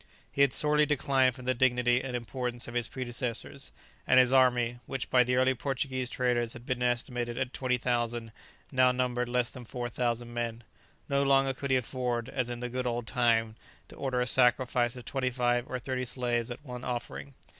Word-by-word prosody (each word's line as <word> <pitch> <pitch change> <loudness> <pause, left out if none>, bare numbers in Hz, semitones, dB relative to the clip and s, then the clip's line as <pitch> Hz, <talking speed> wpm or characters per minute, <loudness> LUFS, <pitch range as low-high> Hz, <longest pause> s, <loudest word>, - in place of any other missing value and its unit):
He 140 - 0
had 140 -2 +5
sorely 150 +2 +4
declined 135 -3 +2
from 130 -2 -11
the 130 - +2
dignity 125 0 +2
and 125 -2 -4
importance 120 0 -3
of 120 - -8
his 120 -1 0
predecessors, 125 -2 -4 0.4
and 130 - +6
his 125 0 +4
army, 125 -2 +3
which 135 -2 -4
by 125 -1 +6
the 125 +1 0
early 130 +1 +3
Portuguese 130 -1 -2
traders 120 -2 0
had 120 0 -11
been 125 -1 -2
estimated 120 -1 -1
at 130 0 -2
20,000, 120 -2 -1 0.4
now 130 -2 +4
numbered 125 -1 -1
less 125 0 0
than 125 - -9
4000 120 0 -3
men; 120 -1 -3 0.4
no 140 0 +1
longer 135 -1 +3
could 140 +1 -5
he 130 - +4
afford, 125 -1 -2
as 125 -2 -2
in 120 0 -5
the 125 - -2
good 125 +1 -2
old 120 -1 -2
time, 115 -2 +1 0.3
to - - -12
order 130 -3 -2
a 125 - +1
sacrifice 125 -1 +3
of 125 - -10
twenty 130 -2 -1
five 120 -1 0
or 130 - -2
thirty 130 0 -3
slaves 120 -1 -1
at 125 +5 -8
one 125 -2 -7
offering. 70 - -5
125 Hz, 190 wpm, -29 LUFS, 120-130 Hz, 0.4 s, and